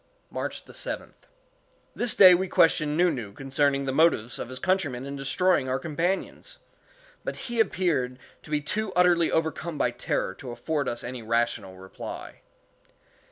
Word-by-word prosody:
March -, -, -4 dB
7th. -, -, -6 dB, 0.7 s
This 240 Hz, -2 st, +2 dB
day 185 Hz, -2 st, +9 dB
we 185 Hz, +2 st, +1 dB
questioned 155 Hz, -3 st, +3 dB
Nu 175 Hz, 0 st, +4 dB
Nu 115 Hz, -8 st, -5 dB
concerning 140 Hz, +2 st, 0 dB
the 135 Hz, -, -1 dB
motives 135 Hz, -6 st, +2 dB
of -, -, -5 dB
his 130 Hz, -, -7 dB
countrymen 145 Hz, -8 st, 0 dB
in 140 Hz, 0 st, -5 dB
destroying 140 Hz, +1 st, +1 dB
our 130 Hz, -, +1 dB
companions; 170 Hz, +5 st, -3 dB, 0.7 s
but -, -, -4 dB
he 240 Hz, -1 st, -5 dB
appeared 165 Hz, -, +1 dB, 0.2 s
to -, -, -15 dB
be 150 Hz, -1 st, 0 dB
too 210 Hz, +7 st, -2 dB
utterly 175 Hz, -2 st, +4 dB
overcome 160 Hz, 0 st, -1 dB
by -, -, +1 dB
terror -, -, -2 dB
to 130 Hz, -, -10 dB
afford 140 Hz, +5 st, -2 dB
us 120 Hz, -, -4 dB
any 125 Hz, 0 st, -6 dB
rational 115 Hz, -4 st, -1 dB
reply. 95 Hz, 0 st, -9 dB
150 Hz, 155 wpm, -26 LUFS, 125-175 Hz, 0.7 s, day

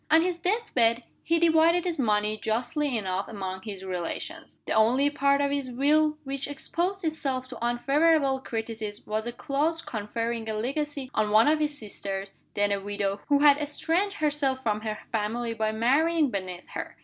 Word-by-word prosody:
On 320 Hz, +2 st, +6 dB
his 355 Hz, -1 st, -1 dB
death 430 Hz, +6 st, -1 dB
bed, 235 Hz, 0 st, +3 dB, 0.2 s
he 335 Hz, -, +2 dB
divided 335 Hz, +1 st, +4 dB
his 340 Hz, -4 st, -2 dB
money 210 Hz, -3 st, +2 dB
justly 245 Hz, +6 st, -1 dB
enough 190 Hz, -2 st, -2 dB
among 190 Hz, -3 st, -5 dB
his 195 Hz, -3 st, -7 dB
relations. 180 Hz, -3 st, -5 dB
The -, -, -1 dB
only 250 Hz, +6 st, +4 dB
part 280 Hz, 0 st, +2 dB
of 280 Hz, 0 st, +1 dB
his 280 Hz, -2 st, -1 dB
Will 300 Hz, +4 st, +3 dB
which 275 Hz, 0 st, -3 dB
exposed 350 Hz, +7 st, -2 dB
itself 270 Hz, -5 st, -2 dB
to 240 Hz, -2 st, -8 dB
unfavorable 275 Hz, +3 st, +2 dB
criticism, 225 Hz, -4 st, -5 dB
was 215 Hz, +2 st, -2 dB
a -, -, -2 dB
clause 305 Hz, +6 st, -1 dB
conferring 230 Hz, +1 st, -3 dB
a 215 Hz, -, -2 dB
legacy 275 Hz, +3 st, -3 dB
on 215 Hz, -1 st, +1 dB
one 215 Hz, +4 st, +5 dB
of 305 Hz, +1 st, +3 dB
his 295 Hz, -1 st, 0 dB
sisters 195 Hz, -3 st, -5 dB, 0.2 s
(then 205 Hz, 0 st, +2 dB
a 200 Hz, -, +1 dB
widow) 200 Hz, 0 st, -2 dB
who 285 Hz, -1 st, +3 dB
had 290 Hz, -1 st, +7 dB
estranged 330 Hz, +7 st, 0 dB
herself 290 Hz, -6 st, 0 dB
from 210 Hz, -2 st, 0 dB
her 215 Hz, -1 st, -3 dB
family 230 Hz, +2 st, -1 dB
by 220 Hz, -1 st, 0 dB
marrying 285 Hz, +7 st, +2 dB
beneath 185 Hz, -3 st, -5 dB
her. -, -, -6 dB
255 Hz, 175 wpm, -27 LUFS, 215-300 Hz, 0.2 s, had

